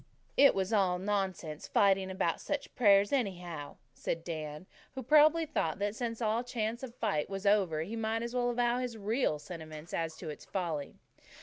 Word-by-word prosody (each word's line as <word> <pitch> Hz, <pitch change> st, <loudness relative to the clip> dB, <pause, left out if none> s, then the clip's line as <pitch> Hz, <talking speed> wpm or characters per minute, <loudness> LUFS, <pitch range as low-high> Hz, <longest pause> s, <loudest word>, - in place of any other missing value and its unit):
"It 280 Hz, 0 st, +6 dB
was 190 Hz, +2 st, -1 dB
all 190 Hz, -4 st, +3 dB
nonsense 190 Hz, -5 st, -2 dB
fighting 195 Hz, -1 st, +3 dB
about 185 Hz, -3 st, -1 dB
such 290 Hz, -1 st, -3 dB
prayers, 200 Hz, -4 st, +5 dB
anyhow," 175 Hz, -, -2 dB, 0.2 s
said 165 Hz, +4 st, -3 dB
Dan, 155 Hz, -1 st, -5 dB, 0.3 s
who 265 Hz, -, -4 dB
probably 310 Hz, +5 st, +5 dB
thought 165 Hz, -, -1 dB
that 205 Hz, +1 st, -1 dB
since 230 Hz, 0 st, -3 dB
all 220 Hz, +2 st, +1 dB
chance 235 Hz, -1 st, -3 dB
of 260 Hz, -, -5 dB
a -, -, -19 dB
fight 200 Hz, -11 st, -1 dB
was 195 Hz, 0 st, -5 dB
over, 190 Hz, -7 st, +3 dB
he 210 Hz, +7 st, -5 dB
might 225 Hz, 0 st, -1 dB
as 235 Hz, +1 st, -4 dB
well 245 Hz, -1 st, +1 dB
avow 240 Hz, 0 st, +1 dB
his 245 Hz, -3 st, -3 dB
real 215 Hz, -, 0 dB
sentiments 155 Hz, 0 st, -9 dB
as 165 Hz, -1 st, -2 dB
to -, -, -7 dB
its 150 Hz, -, -8 dB
folly. 165 Hz, -7 st, -3 dB
200 Hz, 185 wpm, -32 LUFS, 170-235 Hz, 0.3 s, It